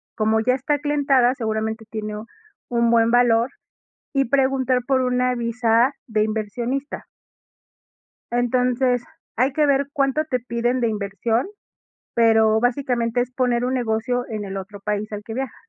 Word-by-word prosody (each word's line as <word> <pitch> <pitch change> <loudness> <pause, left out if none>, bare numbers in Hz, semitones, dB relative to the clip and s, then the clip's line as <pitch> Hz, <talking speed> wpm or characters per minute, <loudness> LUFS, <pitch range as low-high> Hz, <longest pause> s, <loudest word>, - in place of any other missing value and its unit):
como 220 0 +2
ya 250 +3 +2
está 270 +3 0
aclientada, 280 -4 +2
seguramente, 220 -1 -3
tiene 215 -1 -5 0.5
un 235 -1 +2
buen 230 0 +4
valor, 240 0 +4 0.6
y 275 -1 +2
preguntar 260 -1 +1
por 265 -2 +2
una 250 0 +1
visa 235 +2 +2
de 215 -2 +1
inversionista. 235 +6 -3 1.3
Entonces, 245 +1 +1 0.3
hay 255 +4 +2
que 305 0 +2
ver 280 -1 +2
cuánto 275 +2 +1
te 255 -5 -1
piden 240 +1 -1
de 235 - +1
inversión, 215 - -1 0.7
pero 220 -1 +4
básicamente 245 -1 0
es 250 +1 -3
poner 245 -1 0
un 255 - -1
negocio 245 +1 -1
en 215 -2 -4
el 195 0 -5
otro 195 +1 -8
país 210 +1 -3
al 210 0 -6
que 225 - -7
viaja. 260 0 -4
240 Hz, 145 wpm, -22 LUFS, 220-255 Hz, 1.3 s, buen